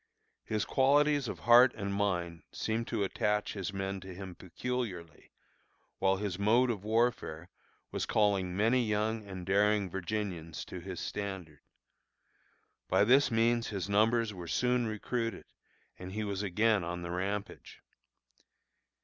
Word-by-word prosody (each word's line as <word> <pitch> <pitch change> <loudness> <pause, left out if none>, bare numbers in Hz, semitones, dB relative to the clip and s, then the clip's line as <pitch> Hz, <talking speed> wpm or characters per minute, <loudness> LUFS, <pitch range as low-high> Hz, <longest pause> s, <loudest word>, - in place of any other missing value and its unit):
His 110 -1 -1
qualities 145 0 +3
of - - -6
heart 120 +2 +7
and 100 -1 -3
mind 90 -5 -1
seemed 115 +1 -2
to 110 -4 -1
attach 105 +2 0
his 100 -2 -4
men 95 0 -3
to 95 0 -10
him 95 -1 -7
peculiarly, 95 -4 -5 0.7
while 95 0 +2
his 100 -2 -3
mode 120 +5 +4
of 100 -4 -5
warfare 110 -7 0 0.4
was - - -2
calling 95 -4 +1
many 115 +4 +3
young 110 0 -1
and 95 -3 -8
daring 100 0 +2
Virginians 90 -3 -4
to 90 - -7
his 90 0 -7
standard. 95 -7 -5 1.3
By - - +4
this 130 +7 +5
means 115 0 +2
his 100 -2 -3
numbers 110 +2 +2
were 90 -3 -8
soon 125 +4 +1
recruited, 115 +2 -3 0.5
and 90 +1 -7
he 110 +1 -2
was 100 -1 -3
again 105 +1 +2
on 85 +1 -4
the 85 - -5
rampage. 100 +3 -4
105 Hz, 140 wpm, -31 LUFS, 95-115 Hz, 1.3 s, heart